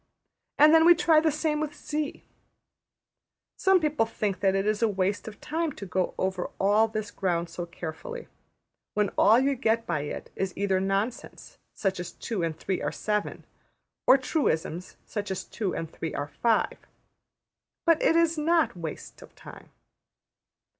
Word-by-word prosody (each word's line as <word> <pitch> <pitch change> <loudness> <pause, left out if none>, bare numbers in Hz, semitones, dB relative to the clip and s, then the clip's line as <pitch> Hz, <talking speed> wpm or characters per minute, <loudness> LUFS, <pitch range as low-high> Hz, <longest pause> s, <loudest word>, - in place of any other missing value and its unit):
And 305 +1 +7
then 325 0 +7
we 345 +1 +8
try 320 -1 +4
the 315 0 +2
same 305 0 -1
with 300 -1 -3
$z$. 300 0 -4 1.3
Some 380 -1 +4
people 300 -8 +1
think 205 -4 -2
that 195 -1 +2
it 195 0 0
is 215 +1 0
waste 200 -1 0
of 215 - -9
time 325 0 -2
to 200 - -8
go 185 0 -1
over 190 -1 -2
all 210 +3 +4
this 215 -1 -4
ground 170 -4 -1
so 175 +1 -5
carefully, 175 - -7 0.7
when 210 -1 +2
all 225 +3 +5
you 275 +2 +2
get 230 -3 0
by 170 -3 -1
it 145 +1 -6
is 190 -1 -3
either 195 -1 +1
nonsense, 195 +5 -3 0.2
such 190 -3 -1
as 180 -1 -6
``2 210 -7 -3
and 165 -2 -2
3 190 - -2
are - - 0
7''; 210 -1 -2 0.6
or 270 - +8
truisms, 185 - -2
such 205 -2 -4
as 190 - -3
``2 200 -5 -3
and 165 -1 -5
3 160 - -5
are 145 0 -4
5.'' 230 -2 +2 1.1
But 330 -2 +4
it 325 - +3
is 335 -1 +3
not 315 - +2
waste 165 -3 -7
of - - -15
time. - - -13
210 Hz, 165 wpm, -27 LUFS, 185-300 Hz, 1.3 s, we